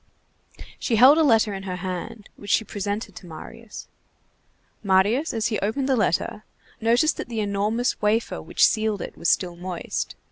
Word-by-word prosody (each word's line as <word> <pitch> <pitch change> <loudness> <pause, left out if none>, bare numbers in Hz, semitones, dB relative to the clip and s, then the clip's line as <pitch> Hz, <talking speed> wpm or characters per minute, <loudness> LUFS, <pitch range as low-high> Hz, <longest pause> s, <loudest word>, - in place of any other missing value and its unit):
She 235 - 0
held 265 +8 +7
a - - +5
letter 225 -6 +3
in 195 - -5
her 190 -2 -4
hand, 185 +3 -6
which 205 - -11
she 220 - +3
presented 205 +2 -4
to 180 - -11
Marius. 210 +7 -10 0.9
Marius, 205 +9 +2
as 225 -1 -1
he 215 - -1
opened 240 +7 -1
the 270 - +3
letter, 210 0 0 0.4
noticed 240 +8 +2
that - - -6
the 230 -2 -3
enormous 210 +4 -1
wafer 215 +2 0
which - - +3
sealed 215 -3 0
it - - -8
was 170 - -1
still 175 -2 +1
moist. 180 0 -4
215 Hz, 170 wpm, -24 LUFS, 195-230 Hz, 0.9 s, held